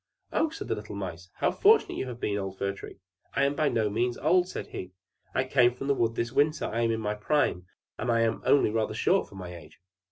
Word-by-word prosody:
"Oh," 320 - +2
said 325 - -7
the - - 0
little 105 0 -7
Mice, 90 -2 -6
"how - - +1
fortunate 435 +2 +4
you 130 - -3
have 120 -2 -7
been, 105 - -1
old 95 -1 -5
Fir 100 0 -1
Tree!" 100 - -10 0.4
"I 140 - +3
am 140 +1 +2
by 145 0 +1
no 110 -2 +1
means 120 +4 0
old," 180 +5 +3
said - - -5
he. 90 0 -7 0.4
"I 130 - +3
came 125 -2 +3
from 135 - -6
the 140 - +3
wood 115 -3 0
this 115 +1 -1
winter; 150 +3 +2
I 115 +2 -1
am 115 - +2
in 110 - -1
my 105 -1 -1
prime, 105 -5 0 0.3
and 125 - -2
am 115 -1 +2
only 140 -6 +4
rather 110 0 -1
short - - +2
for - - -14
my 90 -2 -7
age." 80 -2 -14
115 Hz, 245 wpm, -28 LUFS, 100-135 Hz, 0.4 s, fortunate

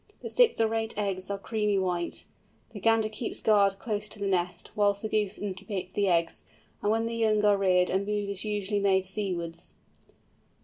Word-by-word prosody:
The - - -5
six - - +4
or 225 0 +2
eight 225 -1 -2
eggs 195 -2 -2
are 200 - -2
creamy 210 0 0
white. 180 -2 -2 0.5
The 215 - -8
gander 225 +1 +3
keeps 215 +2 -4
guard 200 -2 +3
close 210 0 -3
to - - -2
the 200 - -3
nest, 180 -2 -1
whilst 205 0 +2
the - - 0
goose 210 -2 0
incubates 195 -1 -5
the 200 -1 +1
eggs; 170 -2 +1 0.4
and 205 - 0
when 225 +1 +1
the 230 - -3
young 215 -2 +2
are 205 -1 +5
reared 185 -2 +3
a 190 - +2
move 205 0 -2
is 200 -2 -1
usually 205 -1 -1
made 190 -1 +2
seawards. 185 -4 -4
200 Hz, 190 wpm, -28 LUFS, 190-215 Hz, 0.5 s, are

